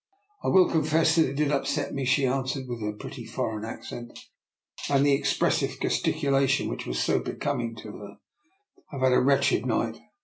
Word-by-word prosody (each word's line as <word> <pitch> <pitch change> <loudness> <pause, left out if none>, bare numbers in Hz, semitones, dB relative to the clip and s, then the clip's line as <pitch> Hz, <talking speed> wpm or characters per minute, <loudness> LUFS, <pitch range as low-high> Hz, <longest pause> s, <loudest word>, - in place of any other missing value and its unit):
I - - -2
will 190 -1 +6
confess 160 +1 +2
that 160 -4 +4
it 135 - -6
did 150 0 +1
upset 140 - -1
me/' 135 -2 -2
she 135 +2 +3
answered, 130 +1 -1
with 120 -2 -5
her 105 0 -2
pretty 120 +4 -8
foreign 115 -2 -3
accent 120 +1 -8 0.7
and 140 0 +3
the 145 - +4
expressive 135 - +1
gesticulation 140 -3 +1
which - - -5
was - - -2
so 60 - +2
be - - -5
coming 120 -6 -2
to 105 -1 -9
her. 100 -1 -11 0.4
" 390 -1 -34
I - - -7
have 135 - -5
had 130 -1 +4
a - - +4
wretched 140 -4 +3
night. 115 -1 -1
135 Hz, 195 wpm, -27 LUFS, 115-145 Hz, 0.7 s, will